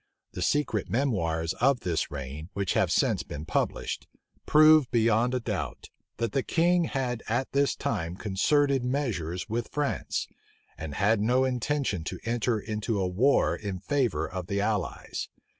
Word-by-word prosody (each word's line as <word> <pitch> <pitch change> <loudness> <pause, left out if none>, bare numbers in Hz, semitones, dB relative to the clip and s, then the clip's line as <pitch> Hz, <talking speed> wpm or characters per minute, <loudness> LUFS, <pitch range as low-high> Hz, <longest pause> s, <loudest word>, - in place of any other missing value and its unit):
The - - -6
secret 115 -1 0
memoirs 85 - 0
of 130 -1 +3
this 85 -3 -1
reign, 75 +3 -6
which 100 -3 -1
have - - +2
since - - +2
been 75 +2 -7
published,[*] - - -2 0.4
prove 155 -2 +6
beyond 115 +1 +2
a - - +1
doubt, 100 - -4 0.3
that 115 -2 -1
the 135 - +1
king 175 +4 +2
had 125 -5 -2
at 120 +4 0
this 140 0 +2
time 85 +1 -2
concerted 135 +8 +2
measures 115 - -2
with 115 +1 -2
France, 145 -1 -2 0.5
and 75 -2 -6
had 105 +4 +2
no 125 +4 +3
intention 130 - -1
to - - -4
enter 115 -1 0
into 105 0 -2
a 95 - +1
war 120 +11 +3
in 100 -3 -5
favor 135 +2 0
of 90 -1 -6
the 100 - -1
allies. 105 -2 -2
115 Hz, 155 wpm, -28 LUFS, 95-135 Hz, 0.5 s, prove